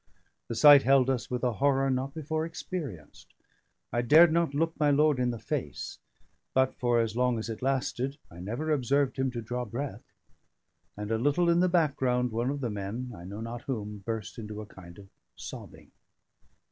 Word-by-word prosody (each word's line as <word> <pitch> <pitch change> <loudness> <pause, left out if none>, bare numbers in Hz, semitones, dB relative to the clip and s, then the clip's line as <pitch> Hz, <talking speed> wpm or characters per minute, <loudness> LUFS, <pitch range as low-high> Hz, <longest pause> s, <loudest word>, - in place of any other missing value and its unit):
The 115 - -4
sight 145 +4 +9
held 135 0 +4
us 125 -3 -3
with 125 0 -3
a 125 - +2
horror 135 +2 +2
not 130 +3 -2
before 155 0 -2
experienced. 160 - -7 0.6
I 120 - +2
dared 155 +7 +7
not 165 -4 +1
look 165 +2 +1
my 150 -1 +3
lord 145 -1 +3
in 125 -1 +1
the 120 - -3
face; - - -5 0.6
but 130 0 +3
for 120 -1 +1
as 115 -1 -1
long 125 -1 +2
as 110 +1 -4
it 110 - -6
lasted, 135 +1 -1
I 85 - -12
never 120 - -3
observed 140 -1 +1
him 130 0 +1
to 120 -2 -5
draw 125 +2 -3
breath; 125 +5 -6 0.9
and 105 +1 -5
a 110 - +1
little 145 +7 +2
in 170 - +3
the 180 +1 +3
background 135 -7 +1
one 120 +3 -1
of 140 0 -3
the 120 -4 -2
men 105 +5 -5
(I 85 - -11
know 100 +4 -7
not 115 +1 -6
whom) 105 -5 -5
burst 110 +2 -5
into 105 -1 -7
a 110 - -6
kind 90 -4 -14
of 100 -1 -13 0.3
sobbing. - - -10
125 Hz, 190 wpm, -29 LUFS, 115-145 Hz, 0.9 s, sight